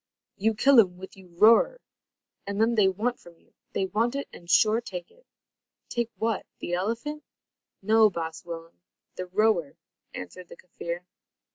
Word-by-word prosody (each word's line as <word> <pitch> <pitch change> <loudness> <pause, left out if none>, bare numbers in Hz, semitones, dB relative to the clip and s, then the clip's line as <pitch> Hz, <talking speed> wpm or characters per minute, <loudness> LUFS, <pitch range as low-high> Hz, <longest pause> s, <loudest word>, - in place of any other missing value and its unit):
"You 220 +2 +1
kill 270 +3 +6
um 180 -5 +3
with 190 +1 -10
you 190 -1 -15
roer, 230 - +5 0.7
and 200 +1 -3
then 225 +2 +3
they 210 -4 +4
want 220 +6 -1
from 170 -1 -16
you. - - -31 0.2
They 190 - 0
want 225 +7 0
it, 280 - -3
and 170 - -13
sure 215 +5 +4
take 180 -6 -7
it." - - -26 0.6
"Take 235 -1 -1
what 225 -3 -1
the 175 - -5
elephant?" 230 +11 -2 0.6
"No, 220 +1 +5
baas 165 -3 -5
Willem, 165 0 -9 0.3
the 185 - -6
roer," 185 -5 +1 0.4
answered 175 - -8
the - - -12
Kaffir. 170 -1 -6
200 Hz, 160 wpm, -27 LUFS, 175-230 Hz, 0.7 s, kill